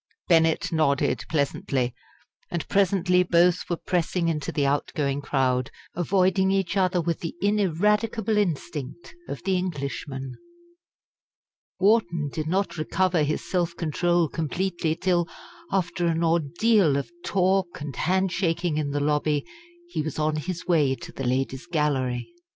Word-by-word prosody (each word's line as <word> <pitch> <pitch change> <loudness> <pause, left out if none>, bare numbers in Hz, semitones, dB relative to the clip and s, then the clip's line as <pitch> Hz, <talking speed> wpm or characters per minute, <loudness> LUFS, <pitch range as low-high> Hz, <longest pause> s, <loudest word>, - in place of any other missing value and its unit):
Bennett 165 -2 +3
nodded 140 -7 +1
pleasantly, 140 -4 0 0.6
and 170 -2 -3
presently 185 -2 +3
both 175 0 +3
were 175 - 0
pressing 175 -1 0
into 150 -3 -2
the 145 - 0
out 140 +1 0
going 140 -3 0
crowd, 130 -3 0 0.2
avoiding 190 +2 +2
each 195 -1 0
other 185 -2 +2
with 170 -1 -1
the 165 - -5
ineradicable 210 +3 +1
instinct 165 -5 -3 0.2
of 140 - -6
the 190 0 +1
Englishman. 140 -6 -4 1.5
Wharton 180 -7 +2
did 155 -1 -3
not 190 +2 0
recover 175 +2 +1
his 150 +1 -1
self 175 -2 0
control 175 +1 +1
completely 165 +2 -1
till, 175 -1 +1 0.4
after 175 -2 0
an 165 0 +1
ordeal 170 +1 +3
of 140 +4 -4
talk 190 -1 +1
and 145 -3 -6
handshaking 175 -1 0
in 150 -2 -1
the 145 +1 -1
lobby, 150 0 +1 0.4
he 345 - -2
was 155 -1 -4
on 155 0 +1
his 180 +3 -4
way 150 -7 +3
to - - -10
the 135 - -5
Ladies' 130 +3 -1
Gallery. 140 -7 0
170 Hz, 135 wpm, -25 LUFS, 145-185 Hz, 1.5 s, Bennett